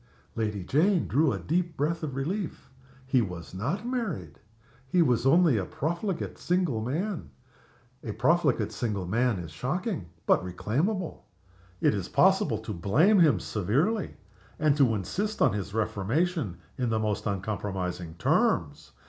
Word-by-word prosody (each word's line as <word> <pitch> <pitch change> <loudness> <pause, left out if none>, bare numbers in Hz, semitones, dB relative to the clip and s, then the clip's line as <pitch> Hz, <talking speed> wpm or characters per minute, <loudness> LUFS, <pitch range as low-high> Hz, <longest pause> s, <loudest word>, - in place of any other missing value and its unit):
Lady 105 -4 -2
Jane 170 - +2
drew 150 +1 +3
a 100 - -1
deep 170 - -1
breath 160 +4 0
of 145 -5 -4
relief. 165 +3 -4 0.3
He 130 -1 +3
was 90 -6 -6
not 145 - -2
married! 200 - -3 0.5
He 175 +6 +4
was 125 -3 +2
only 165 -4 +5
a 95 - -1
profligate 170 - -3
single 175 -10 0
man. 165 - -3 0.7
A 110 - -4
profligate 125 - +2
single 105 -4 -2
man 115 +4 +1
is 85 -3 -7
shocking 135 - -3 0.2
but - - +3
reclaimable. 150 - -2 0.5
It - - +4
is - - -3
possible - - +3
to 110 - -6
blame 140 - +4
him 160 -4 +5
severely, 140 - 0 0.4
and 150 -2 +3
to 130 -6 +4
insist 200 - -2
on - - +4
his 100 -1 -3
reformation 110 - -1 0.2
in 125 -2 +1
the 110 - +1
most 110 0 -1
uncompromising 95 -4 -3
terms. 80 - +1
125 Hz, 140 wpm, -28 LUFS, 100-170 Hz, 0.7 s, only